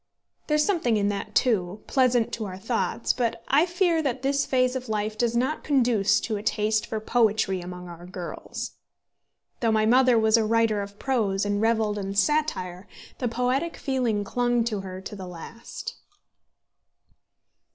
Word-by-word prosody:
There 300 Hz, -, +2 dB
is 300 Hz, -, +3 dB
something 320 Hz, -, +1 dB
in 205 Hz, 0 st, +1 dB
that, 200 Hz, -1 st, -4 dB
too, 210 Hz, -5 st, +1 dB
pleasant 250 Hz, -3 st, +2 dB
to 220 Hz, -, -3 dB
our 185 Hz, -2 st, -6 dB
thoughts, 230 Hz, +3 st, -1 dB
but 240 Hz, -3 st, -2 dB
I 300 Hz, +6 st, +4 dB
fear 345 Hz, -2 st, +2 dB
that 265 Hz, -3 st, -2 dB
this 280 Hz, +1 st, +1 dB
phase 255 Hz, -1 st, +2 dB
of 255 Hz, -2 st, -5 dB
life 215 Hz, 0 st, -1 dB
does 235 Hz, +1 st, 0 dB
not 265 Hz, +6 st, 0 dB
conduce 230 Hz, -7 st, +3 dB
to 220 Hz, -3 st, -2 dB
a -, -, -5 dB
taste 215 Hz, 0 st, 0 dB
for 220 Hz, -, -3 dB
poetry 215 Hz, -4 st, +1 dB
among 180 Hz, 0 st, -8 dB
our 175 Hz, 0 st, -10 dB
girls. 180 Hz, -1 st, -6 dB, 0.9 s
Though 230 Hz, -3 st, +2 dB
my 215 Hz, 0 st, +3 dB
mother 250 Hz, +1 st, +5 dB
was 220 Hz, 0 st, +4 dB
a 225 Hz, -, +2 dB
writer 225 Hz, -1 st, +2 dB
of 200 Hz, 0 st, -8 dB
prose, 210 Hz, -7 st, 0 dB
and 205 Hz, 0 st, 0 dB
revelled 220 Hz, -2 st, +1 dB
in 195 Hz, 0 st, -4 dB
satire, 200 Hz, -, 0 dB, 0.3 s
the 250 Hz, -, 0 dB
poetic 250 Hz, +7 st, -1 dB
feeling 245 Hz, -7 st, 0 dB
clung 240 Hz, +2 st, +1 dB
to 220 Hz, -3 st, -2 dB
her 185 Hz, -1 st, -7 dB
to 200 Hz, -, -7 dB
the 190 Hz, -2 st, -7 dB
last. 180 Hz, +7 st, -8 dB
225 Hz, 170 wpm, -26 LUFS, 205-255 Hz, 0.9 s, mother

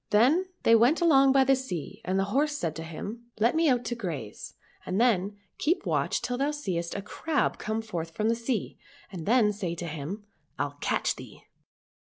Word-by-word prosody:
Then 255 Hz, -, +4 dB, 0.2 s
they 230 Hz, -, +5 dB
went 240 Hz, +8 st, +5 dB
along 275 Hz, -6 st, +5 dB
by 270 Hz, 0 st, +5 dB
the 270 Hz, +1 st, +4 dB
sea, 200 Hz, -, -5 dB
and 190 Hz, -3 st, 0 dB
the -, -, +3 dB
horse 295 Hz, +2 st, +2 dB
said 165 Hz, -, -2 dB
to 165 Hz, -, -5 dB
him, 200 Hz, +9 st, -7 dB
" -, -, -24 dB
Let 230 Hz, +6 st, +3 dB
me 325 Hz, -1 st, +4 dB
out 245 Hz, -2 st, +2 dB
to -, -, -1 dB
graze, 160 Hz, -, -6 dB, 0.3 s
and 185 Hz, +3 st, -2 dB
then 205 Hz, -4 st, +2 dB, 0.2 s
keep 335 Hz, +6 st, +1 dB
watch -, -, 0 dB
till 245 Hz, 0 st, -2 dB
thou 280 Hz, +2 st, +2 dB
seest 185 Hz, -, -3 dB
a 200 Hz, -, -4 dB
crab 305 Hz, +7 st, -1 dB
come 220 Hz, +1 st, -2 dB
forth 170 Hz, -7 st, -4 dB
from 210 Hz, +6 st, -1 dB
the 230 Hz, -, +3 dB
sea, 230 Hz, -1 st, -3 dB, 0.3 s
and 175 Hz, -5 st, -7 dB
then 220 Hz, -2 st, +4 dB
say 185 Hz, -5 st, -3 dB
to 170 Hz, -, -5 dB
him, 160 Hz, +7 st, -5 dB, 0.2 s
' -, -, -44 dB
Pll -, -, -2 dB
catch -, -, 0 dB
thee.' -, -, -12 dB
225 Hz, 210 wpm, -28 LUFS, 185-265 Hz, 0.3 s, they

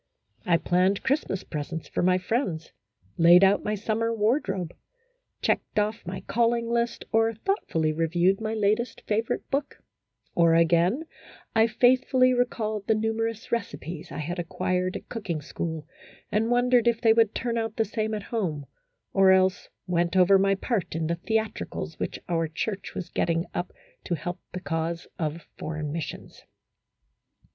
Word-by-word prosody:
I 170 Hz, -1 st, +5 dB
planned 185 Hz, +3 st, +1 dB
Christmas 265 Hz, -9 st, 0 dB
presents 155 Hz, +1 st, -5 dB
for -, -, -2 dB
my 180 Hz, +1 st, +4 dB
friends, 185 Hz, -, -2 dB, 0.5 s
laid 175 Hz, +3 st, +8 dB
out 195 Hz, +1 st, +4 dB
my 210 Hz, -, -1 dB
summer 225 Hz, +2 st, -1 dB
wardrobe, 210 Hz, -, 0 dB, 0.7 s
checked -, -, 0 dB
off 210 Hz, -2 st, 0 dB
my 185 Hz, +1 st, -4 dB
calling 235 Hz, 0 st, +1 dB
list, 235 Hz, 0 st, -1 dB
or 225 Hz, 0 st, +2 dB
thoughtfully 185 Hz, -, 0 dB
reviewed 170 Hz, +5 st, +2 dB
my 220 Hz, 0 st, -2 dB
latest 215 Hz, +3 st, 0 dB
favorite 220 Hz, +2 st, -1 dB
book, 275 Hz, +1 st, -2 dB, 0.5 s
or 165 Hz, -1 st, +4 dB
again, 170 Hz, -, +3 dB, 0.5 s
I 225 Hz, 0 st, +5 dB
faithfully 255 Hz, +2 st, +4 dB
recalled 220 Hz, -4 st, -1 dB
the 220 Hz, -, +4 dB
numerous 225 Hz, 0 st, -2 dB
recipes 170 Hz, -7 st, -4 dB
I -, -, -6 dB
had 170 Hz, +4 st, -3 dB
acquired 180 Hz, +2 st, -1 dB
at -, -, -7 dB
cooking 195 Hz, -9 st, -4 dB
school, 160 Hz, +1 st, -5 dB, 0.5 s
and 220 Hz, +2 st, +1 dB
wondered 245 Hz, -1 st, +3 dB
if 235 Hz, -1 st, +3 dB
they 225 Hz, -1 st, +5 dB
would 225 Hz, -2 st, +3 dB
turn 235 Hz, -1 st, -1 dB
out 225 Hz, -1 st, -3 dB
the 225 Hz, -, +1 dB
same 220 Hz, 0 st, -2 dB
at 210 Hz, -, -5 dB
home, 170 Hz, -12 st, -2 dB, 0.5 s
or 195 Hz, -1 st, +5 dB
else 190 Hz, 0 st, +2 dB, 0.2 s
went 175 Hz, -1 st, 0 dB
over 190 Hz, +1 st, +6 dB
my 195 Hz, 0 st, +3 dB
part 200 Hz, -4 st, -2 dB
in 165 Hz, -1 st, -1 dB
the 170 Hz, +2 st, 0 dB
theatricals 215 Hz, -5 st, -2 dB
which -, -, -3 dB
our 165 Hz, -2 st, 0 dB
church 195 Hz, +5 st, -4 dB
was 180 Hz, -1 st, -5 dB
getting 165 Hz, 0 st, 0 dB
up 175 Hz, -, -3 dB, 0.3 s
to 175 Hz, -, 0 dB
help 175 Hz, +4 st, -5 dB
the 180 Hz, -, -5 dB
cause 165 Hz, +1 st, -2 dB
of 160 Hz, 0 st, -3 dB
Foreign 155 Hz, -2 st, -4 dB
Mis 160 Hz, 0 st, -2 dB
sions. -, -, -10 dB
195 Hz, 155 wpm, -26 LUFS, 170-225 Hz, 0.7 s, laid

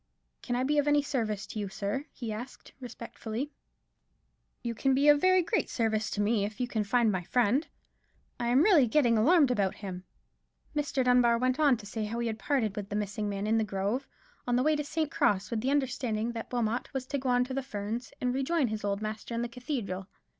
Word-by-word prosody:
"Can 245 Hz, -, -2 dB
I 250 Hz, -, +1 dB
be 295 Hz, +3 st, +2 dB
of 290 Hz, -, +1 dB
any 290 Hz, 0 st, +4 dB
service 225 Hz, -8 st, -2 dB
to 215 Hz, -, -6 dB
you, 200 Hz, -2 st, -3 dB
sir?" 205 Hz, +8 st, -3 dB
he 230 Hz, -4 st, -5 dB
asked, 240 Hz, +4 st, -8 dB
respectfully. 240 Hz, +1 st, -6 dB, 1.1 s
"You 235 Hz, -1 st, -2 dB
can 265 Hz, +3 st, +1 dB
be 280 Hz, +2 st, +3 dB
of 290 Hz, -1 st, +6 dB
very 370 Hz, -1 st, +5 dB
great 435 Hz, +6 st, 0 dB
service 220 Hz, -2 st, 0 dB
to 205 Hz, -, -2 dB
me, 205 Hz, 0 st, +2 dB
if 205 Hz, 0 st, -4 dB
you 250 Hz, -, 0 dB
can 220 Hz, -3 st, -1 dB
find 230 Hz, +1 st, +2 dB
my 185 Hz, -2 st, -1 dB
friend; 245 Hz, -, +2 dB, 0.7 s
I 240 Hz, -, -1 dB
am 255 Hz, +5 st, +5 dB
really 340 Hz, -, +6 dB
getting 240 Hz, -2 st, +3 dB
alarmed 285 Hz, +5 st, +5 dB
about 200 Hz, -6 st, +1 dB
him." 185 Hz, -3 st, -7 dB, 0.7 s
Mr. 285 Hz, -3 st, 0 dB
Dunbar 245 Hz, -2 st, +4 dB
went 255 Hz, +3 st, 0 dB
on 285 Hz, -5 st, +5 dB
to 210 Hz, -, -11 dB
say 215 Hz, +1 st, -3 dB
how 225 Hz, +3 st, -4 dB
he 235 Hz, -, -1 dB
had 220 Hz, -1 st, -3 dB
parted 230 Hz, -8 st, 0 dB
with 205 Hz, -1 st, -5 dB
the 205 Hz, -, -3 dB
missing 210 Hz, 0 st, -2 dB
man 200 Hz, 0 st, -3 dB
in 220 Hz, +1 st, +2 dB
the -, -, +2 dB
grove, 205 Hz, +6 st, -2 dB, 0.4 s
on 245 Hz, -, +2 dB
the 250 Hz, -, +2 dB
way 310 Hz, +1 st, +3 dB
to 295 Hz, -, -1 dB
St. 310 Hz, 0 st, -2 dB
Cross, 200 Hz, +1 st, +1 dB
with 225 Hz, -2 st, -1 dB
the 255 Hz, -, 0 dB
understanding 245 Hz, -5 st, 0 dB
that 230 Hz, -1 st, -7 dB
Wilmot 240 Hz, -1 st, -1 dB
was 260 Hz, -1 st, -2 dB
to 280 Hz, +2 st, -2 dB
go 260 Hz, 0 st, -2 dB
on 245 Hz, 0 st, +4 dB
to 255 Hz, +1 st, -5 dB
the 275 Hz, -, -1 dB
Ferns, 230 Hz, -1 st, -5 dB
and 250 Hz, 0 st, 0 dB
rejoin 270 Hz, 0 st, +1 dB
his 215 Hz, -1 st, -4 dB
old 200 Hz, +1 st, -1 dB
master 215 Hz, +2 st, -4 dB
in 235 Hz, -, -1 dB
the -, -, -1 dB
cathedral. 235 Hz, -7 st, -4 dB
240 Hz, 225 wpm, -30 LUFS, 215-270 Hz, 1.1 s, of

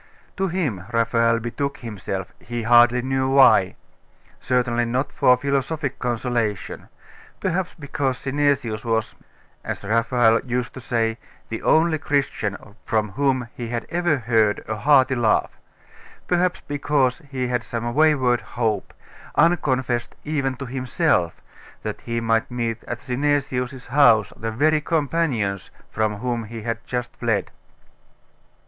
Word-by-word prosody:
To 195 Hz, -, 0 dB
him 155 Hz, -, -2 dB
Raphael 115 Hz, 0 st, +2 dB
betook 130 Hz, +5 st, -3 dB
himself, 95 Hz, -4 st, -5 dB
he 120 Hz, -1 st, -5 dB
hardly 120 Hz, +1 st, +5 dB
knew 130 Hz, 0 st, 0 dB
why; 135 Hz, 0 st, +5 dB, 0.6 s
certainly 120 Hz, -1 st, +1 dB
not 125 Hz, +4 st, -1 dB
for 125 Hz, 0 st, +4 dB
philosophic 140 Hz, +2 st, -2 dB
consolation; 120 Hz, -4 st, -2 dB, 0.5 s
perhaps 185 Hz, -1 st, -2 dB
because 140 Hz, -3 st, -2 dB
Synesius 135 Hz, -6 st, 0 dB
was, 115 Hz, -2 st, -1 dB, 0.5 s
as -, -, -5 dB
Raphael 115 Hz, +1 st, +3 dB
used 125 Hz, -1 st, -2 dB
to 130 Hz, -, -9 dB
say, 115 Hz, -2 st, -1 dB, 0.3 s
the 115 Hz, -, -4 dB
only 160 Hz, 0 st, +3 dB
Christian 135 Hz, -9 st, -1 dB, 0.3 s
from 110 Hz, -2 st, 0 dB
whom 130 Hz, 0 st, 0 dB
he 120 Hz, -, -6 dB
had 115 Hz, 0 st, -3 dB
ever 175 Hz, -3 st, +1 dB
heard 110 Hz, -3 st, +1 dB
a 110 Hz, -, -2 dB
hearty 130 Hz, +3 st, +4 dB
laugh; 120 Hz, -3 st, +2 dB, 0.7 s
perhaps 180 Hz, 0 st, +1 dB
because 145 Hz, -3 st, 0 dB
he 130 Hz, -2 st, -2 dB
had 125 Hz, -1 st, -1 dB
some 120 Hz, 0 st, -4 dB
wayward 135 Hz, -5 st, +3 dB
hope, 110 Hz, -4 st, -2 dB, 0.4 s
unconfessed 130 Hz, -8 st, +1 dB
even 140 Hz, -4 st, -1 dB
to 135 Hz, +2 st, -7 dB
himself, 130 Hz, -, 0 dB, 0.4 s
that -, -, -5 dB
he 115 Hz, 0 st, -2 dB
might 115 Hz, -1 st, +1 dB
meet 115 Hz, -2 st, -3 dB
at 120 Hz, -, -5 dB
Synesius's 130 Hz, -1 st, -1 dB
house 120 Hz, -6 st, +4 dB
the 115 Hz, -, -4 dB
very 150 Hz, +7 st, +2 dB
companions 145 Hz, -, -1 dB, 0.2 s
from 110 Hz, -1 st, 0 dB
whom 120 Hz, +1 st, -3 dB
he 115 Hz, 0 st, -8 dB
had 115 Hz, 0 st, -3 dB
just 125 Hz, -1 st, -4 dB
fled. 110 Hz, -5 st, -1 dB
125 Hz, 130 wpm, -23 LUFS, 115-140 Hz, 0.7 s, hardly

